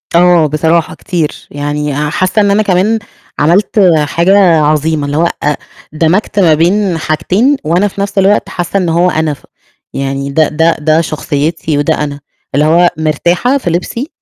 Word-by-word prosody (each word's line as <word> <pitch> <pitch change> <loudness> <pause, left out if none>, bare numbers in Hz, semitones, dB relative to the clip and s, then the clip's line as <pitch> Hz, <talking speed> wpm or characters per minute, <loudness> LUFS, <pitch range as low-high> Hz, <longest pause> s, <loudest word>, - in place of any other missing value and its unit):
آه 175 -2 +4
بصراحة 160 +2 0
كتير، 170 -6 -4
يعني 145 0 -3
حاسة 185 +5 0
إن 200 -1 +2
أنا 215 +2 +2
كمان 205 +3 +1 0.4
عملت 175 +8 +2 0.3
حاجة 175 +6 +2 0.2
عظيمة 150 0 0
اللي 145 +1 -3
هو، 170 - +2 0.2
أ 150 0 +1 0.4
دمجت 170 +7 0
ما 170 -5 +4
بين 180 +3 +1
حاجتين 180 - 0
وأنا 175 +6 +1
في 200 0 -6
نَفس 200 0 -4
الوقت 195 +2 +2
حاسة 175 +2 -3
إن 180 -3 0
هو 175 +2 +2
أنا، 155 -2 -1
ف 140 - -14 0.5
يعني 135 0 -3
ده 155 +1 +2
ده 160 +2 +1
ده 155 +2 +2
شخصيتي 155 0 -2
وده 145 - +1
أنا، 145 -1 -5 0.4
اللي 150 +2 +2
هو 175 +2 +4
مرتاحة 170 - 0
في 255 - -3
لِبسي 185 - -3
165 Hz, 165 wpm, -12 LUFS, 150-185 Hz, 0.5 s, آه